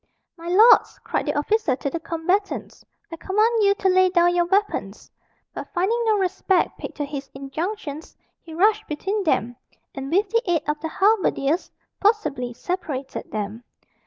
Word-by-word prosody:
"My 335 0 -10
lords!" 420 +7 +5
cried - - -2
the - - -1
officer 300 - +1
to 280 - -3
the 335 - -3
combatants, 360 +5 -2 0.3
"I 330 - -6
command 430 +6 +1
you 400 0 +4
to 385 - -1
lay 370 0 +4
down 350 -1 +3
your 350 0 +2
weapons." 400 +4 -1 0.4
But - - -8
finding 405 +7 +1
no 435 -2 +3
respect 380 0 +1
paid - - -7
to 295 - -3
his 280 -1 -7
injunctions, 310 +3 -5 0.2
he 320 -1 -11
rushed 425 +4 +2
between 390 +8 -2
them, 245 -6 0 0.4
and 270 +1 -6
with 395 +5 +2
the 460 - +3
aid 335 -4 +1
of 300 0 -1
the 320 +1 -4
halberdiers, 375 -6 +1 0.3
forcibly 400 - +1
separated 280 -2 -5
them. 215 +2 -5
350 Hz, 160 wpm, -23 LUFS, 295-405 Hz, 0.4 s, lords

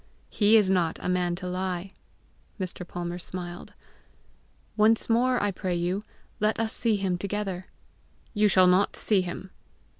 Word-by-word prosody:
"He 215 +1 +5
is 210 -3 +4
not 175 -4 +1
a - - -5
man 180 -1 +1
to 180 +1 -6
lie!" 185 0 -3 0.7
Mr. 180 -1 -5
Palmer 175 0 -5
smiled. 175 0 -7 1.0
"Once 220 +1 +4
more 250 +2 +3
I 205 - 0
pray 180 -1 -3
you, 180 +4 -1 0.4
let 215 +1 +1
us 225 -1 -1
see 225 -3 +1
him 190 -3 -1
together." 195 -2 -3 0.7
"You 210 -1 +3
shall 185 -1 +5
not 180 +2 +3
see 205 -3 +2
him." 180 +1 -6
185 Hz, 150 wpm, -27 LUFS, 180-210 Hz, 1.0 s, He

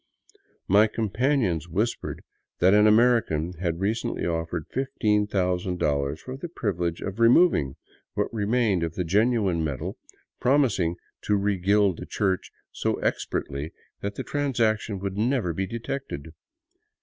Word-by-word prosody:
My 105 +3 +6
companions 110 - 0
whispered 105 +8 -2 0.3
that 95 +3 +4
an 105 +1 +6
American 105 -8 +3
had 85 -2 -1
re 100 +2 +2
cently 115 - -3
offered 80 -1 -2
$15,000 90 - 0
for 130 - -7
the 170 +5 -6
privilege 90 - -2
of 100 +3 -5
removing 115 - +4 0.4
what - - -1
remained 110 -3 +1
of 80 -1 -3
the 90 - -1
genuine 100 -2 +2
metal, 80 +6 -3 0.4
promising 120 - +2 0.3
to 105 - +2
regild 100 -1 +2
the - - -7
church 95 -3 -1 0.2
so - - -1
expertly 70 +3 -3 0.3
that 100 0 -3
the - - -4
transaction 115 -7 0
would 100 +1 -4
never 115 -6 +1
be 95 +3 -2
detected. 115 - -5
100 Hz, 125 wpm, -26 LUFS, 85-115 Hz, 0.4 s, My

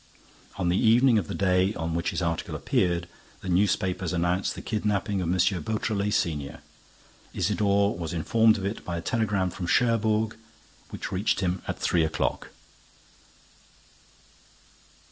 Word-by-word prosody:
On 90 -3 -1
the 90 - +2
evening 120 +1 +5
of 90 - -5
the - - -4
day 95 +1 +2
on 80 0 -3
which 85 +1 -1
his 85 +2 -2
article 85 -1 -2
appeared, 85 -1 0 0.3
the 95 - -6
newspapers 90 -1 +1
announced 90 +2 0
the - - -7
kidnapping 105 -2 -1
of 85 - -2
M. 95 - +1 0.2
Beautrelet, 105 +1 -1
senior. 75 -4 -2 0.7
Isidore 100 0 +1
was 85 -2 -5
informed 110 +6 +3
of 95 - -4
it 100 +3 -4
by 85 -1 -4
a - - -4
telegram 100 -4 0
from 85 0 -5
Cherbourg, 110 -1 +2 0.5
which - - -6
reached 95 +1 0
him 90 0 -1
at - - -3
three 85 - +1
o'clock. 80 - -1
95 Hz, 145 wpm, -26 LUFS, 85-105 Hz, 0.7 s, evening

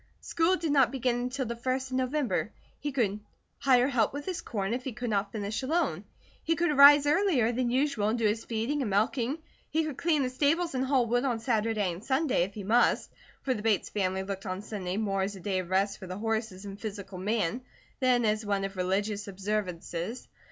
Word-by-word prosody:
School 335 +3 +2
did 330 -4 -2
not 275 -4 +4
begin 250 -2 0
until 250 +2 -2
the 235 0 -4
first 260 +2 -2
of 255 - 0
November. 260 +1 0 0.3
He 295 - -3
could 215 -6 0 0.4
hire 255 -2 +4
help 245 -5 +1
with 285 0 -5
his 365 -2 -3
corn 205 -1 -2
if 250 +1 -3
he 260 - -4
could 245 0 -4
not 200 -1 0
finish 210 +1 -3
alone. 320 +7 0 0.4
He 330 - +1
could 335 -1 +1
arise 285 0 +8
earlier 295 - +3
than 245 0 0
usual 255 -4 +1
and 220 +3 +1
do 230 - 0
his 215 +2 +1
feeding 235 +6 -2
and 240 - -1
milking; 235 +7 +1 0.3
he 320 +1 +1
could 305 -4 -4
clean 315 -4 +2
the 255 - -2
stables, 310 +6 +1
haul 260 -1 +2
wood 245 +2 +1
on 250 -4 0
Saturday 220 -5 0
and 175 +5 -10
Sunday, 265 - +1
if 195 +3 -2
he 205 - -6
must, 230 +5 +2 0.3
for 265 - +1
the 215 - -5
Bates 215 -3 +1
family 190 -2 -1
looked 195 0 -5
on 185 +2 -4
Sunday 195 -3 -4
more 195 -3 0
as 200 +1 -2
a - - -9
day 185 +1 -1
of 180 -2 -5
rest 195 +2 +1
for 185 - -8
the 185 +1 -5
horses 220 -3 -2
and 200 0 -8
physical 200 -3 -6
man 215 +3 0 0.4
than 250 -3 +3
as 215 +1 +1
one 200 -1 -1
of 195 0 -5
religious 200 +3 -1
observances. 195 +1 -3
230 Hz, 215 wpm, -29 LUFS, 200-265 Hz, 0.4 s, arise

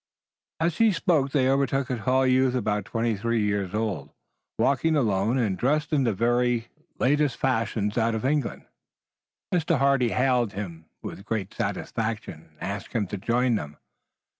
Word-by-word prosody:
As 165 0 0
he 225 -1 +5
spoke 165 -6 +1
they 135 -2 +2
overtook 135 0 +1
a 125 - -1
tall 130 +5 +2
youth 130 0 +3
about 105 -4 -1
twenty 115 +1 -1
three 115 +2 0
years 100 -1 -1
old, 110 -2 -2 0.5
walking 155 +4 +2
alone, 110 -2 +1
and 110 -7 +1
dressed 150 +7 0
in 140 -3 +3
the 115 - +2
very 120 +2 +1 0.3
latest 145 -1 +2
fashion 115 -5 0
out 115 -1 +1
of 110 - -3
England. 145 -2 -1 0.9
Mr. 170 -2 +2
Hardy 135 -2 +3
hailed 125 -3 +1
him 85 -5 -6 0.2
with 95 - -7
great 105 -3 -3
satisfaction 110 -8 -4
and - - -25
asked 100 0 -5
him 115 -4 +1
to 100 +2 -5
join 120 +4 +1
them. 75 -9 -3
120 Hz, 160 wpm, -26 LUFS, 105-135 Hz, 0.9 s, he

